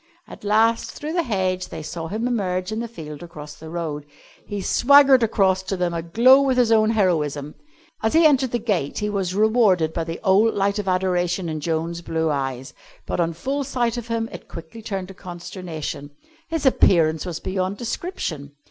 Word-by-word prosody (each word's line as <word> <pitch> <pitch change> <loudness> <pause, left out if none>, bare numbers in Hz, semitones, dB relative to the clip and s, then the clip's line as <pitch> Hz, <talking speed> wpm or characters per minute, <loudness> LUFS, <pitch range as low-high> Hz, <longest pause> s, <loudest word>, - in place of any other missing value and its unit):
At - - -12
last, 220 +2 +2
through 305 +2 -5
the 345 - +2
hedge, 185 - -1
they 160 - -7
saw 165 +1 -5
him 220 +7 -2
emerge 185 -5 -1
in 220 - -2
the 235 - -3
field 150 -9 -9
across 150 -4 -9
the 160 +2 -11
road. 155 -3 -4 0.4
He 205 - -4
swaggered 270 +6 +5
across 195 -4 +2
to 190 0 -4
them 175 -1 -1
aglow 230 +12 +5
with 265 -2 +1
his 240 -2 +3
own 215 -1 +4
heroism. 150 -9 0 0.5
As 220 +5 0
he 325 0 +6
entered 270 -4 +4
the 240 - 0
gate 205 - -2
he 210 0 -1
was 190 -3 -2
rewarded 205 -7 +3
by 165 - -1
the 165 0 -5
old 210 +3 +4
light 200 +1 +1
of 205 - -4
adoration 180 -1 0
in 155 -1 -3
Joan's 165 +2 -2
blue 160 -2 -1
eyes, 135 -2 -3 0.3
but - - -3
on 170 -1 +1
full 270 - -2
sight 245 -3 -1
of 240 -1 -5
him 230 -1 -1
it - - -10
quickly 165 +7 -10
turned 195 -4 -4
to - - -9
consternation. 175 -5 -7 0.4
His 325 -3 -2
appearance 165 - +4
was 175 -3 -5
beyond 190 +1 -2
description. 210 - -5
190 Hz, 190 wpm, -22 LUFS, 165-225 Hz, 0.5 s, he